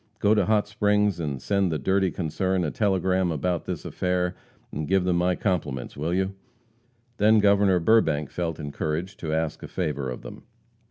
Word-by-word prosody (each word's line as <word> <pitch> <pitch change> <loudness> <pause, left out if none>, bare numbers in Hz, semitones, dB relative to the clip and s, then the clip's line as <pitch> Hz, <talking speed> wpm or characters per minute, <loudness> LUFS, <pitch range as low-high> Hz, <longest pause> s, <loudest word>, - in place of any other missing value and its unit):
Go 105 0 +3
to 105 -4 +2
Hot 105 -1 +2
Springs 105 -2 +1
and 75 -5 -3
send 100 +4 0
the 80 - 0
dirty 95 +5 +1
concern 90 +2 -1
a 75 - -1
telegram 95 -3 +1
about 85 +3 -1
this - - -5
affair, 90 0 -1 0.4
and 75 +1 -4
give 95 -1 +2
them 90 -1 +1
my 90 +1 +2
compliments, 80 - -2
will 75 +4 -2
you?" 95 +2 0 0.8
Then 110 +2 +5
Governor 100 -2 +4
Burbank 80 -6 +2
felt 85 -2 -3
encouraged 75 +5 -4
to 80 - -4
ask 80 -1 -1
a - - -7
favor 75 -7 -2
of 60 - -7
them. - - -9
90 Hz, 175 wpm, -25 LUFS, 80-100 Hz, 0.8 s, Then